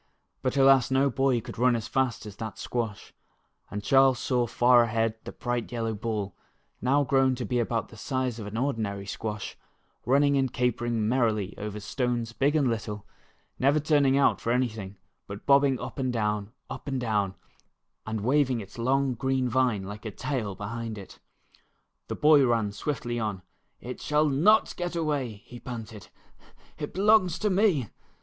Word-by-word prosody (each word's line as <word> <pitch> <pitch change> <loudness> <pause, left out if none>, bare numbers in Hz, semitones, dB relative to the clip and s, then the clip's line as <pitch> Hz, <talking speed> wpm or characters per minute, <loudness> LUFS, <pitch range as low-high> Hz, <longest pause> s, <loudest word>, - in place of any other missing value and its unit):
But, 130 +1 -1
alas, 135 -1 +5
no 135 +1 +2
boy 130 -1 +1
could - - -9
run 125 0 +4
as 115 -1 -3
fast 130 -4 -1
as 105 -2 -9
that 110 -2 -6
squash, 115 -4 -4 0.6
and 105 0 -5
Charles 135 +1 +5
saw 125 -1 0
far 120 +1 +5
ahead 115 -1 +1
the - - -6
bright 120 -1 -3
yellow 115 -2 -2
ball 105 -3 -3 0.5
now 140 +3 +3
grown 135 -1 +2
to 125 -1 -4
be 125 -1 0
about 115 -1 -1
the 115 - -13
size 130 +1 -2
of 105 - -6
an 105 +2 -5
ordinary 110 -7 -2
squash, 105 +1 -5 0.5
running 140 +3 +3
and 135 -2 +1
capering 120 -2 0
merrily 110 -5 +1
over 105 0 -5
stones 120 +1 -2
big 140 +5 +1
and 145 -4 +3
little, 105 -3 -3 0.5
never 140 +4 +3
turning 145 -3 +3
out 140 - +3
for 115 - -1
anything, 110 -6 -2 0.3
but 100 0 -8
bobbing 140 -2 +4
up 125 +3 -7
and 130 -1 0
down, 105 -2 -1 0.2
up - - -8
and 135 -2 -1
down, 105 -5 0 0.7
and 110 -1 -4
waving 130 +1 +2
its 105 +2 -10
long 135 +2 +1
green 130 +1 0
vine 125 -5 +1
like 105 +2 -8
a 110 - -4
tail 120 -3 -3
behind 110 +2 -5
it. 100 - -11 0.9
The - - -4
boy 150 -2 +6
ran 115 -4 +1
swiftly 120 +2 -3
on. 105 -4 -3 0.2
" - - -47
It 125 - -6
shall 150 +1 +2
not 170 +11 +3
get 175 -1 -4
away," 140 -10 -2
he 120 - -11
panted. 110 -5 -8 0.7
"It 150 - -4
belongs 195 -3 +4
to 210 -1 0
me." 185 - +2
120 Hz, 170 wpm, -27 LUFS, 110-135 Hz, 0.9 s, boy